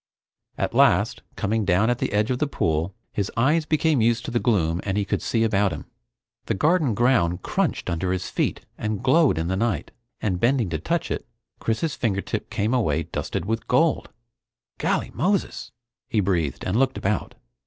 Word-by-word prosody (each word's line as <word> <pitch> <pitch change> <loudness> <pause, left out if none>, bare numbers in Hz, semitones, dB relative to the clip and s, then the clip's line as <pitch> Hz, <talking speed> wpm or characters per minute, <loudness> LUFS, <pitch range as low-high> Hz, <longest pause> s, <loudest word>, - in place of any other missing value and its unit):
At - - -1
last, - - +3
coming 110 +2 0
down 100 +5 +3
at 120 - -1
the - - -1
edge 105 +4 +1
of 125 - -1
the 150 - +1
pool, 80 - -1 0.2
his 100 -1 -2
eyes 150 +6 +2
became 155 -4 +2
used 115 +1 +2
to - - -4
the 120 - +1
gloom 90 -8 +1
and 95 0 -1
he 100 - +1
could - - -1
see 115 -1 +1
about 105 -3 +2
him. - - -6 0.6
The - - 0
garden 150 - +2
ground 95 -8 +2
crunched - - -1
under 90 +1 -1
his 95 -1 -2
feet - - -1 0.2
and 110 +1 -2
glowed 145 - +4
in 80 +1 -1
the 95 - 0
night, 115 +2 -1 0.3
and 95 -4 -1
bending 120 -3 +2
to 80 - -1
touch 170 - -1
it, - - -3 0.3
Chris's 135 +7 -1
fingertip 100 -5 -2
came 105 +4 -1
away 85 - +1
dusted 85 - -4
with 115 +2 -2
gold, 145 +4 +2 0.7
"Golly - - 0
Moses!" 195 +2 -1 0.4
he 110 - +1
breathed, 85 -8 0
and 95 +4 0
looked 135 +1 +2
about. 105 +2 -2
110 Hz, 185 wpm, -24 LUFS, 95-130 Hz, 0.7 s, glowed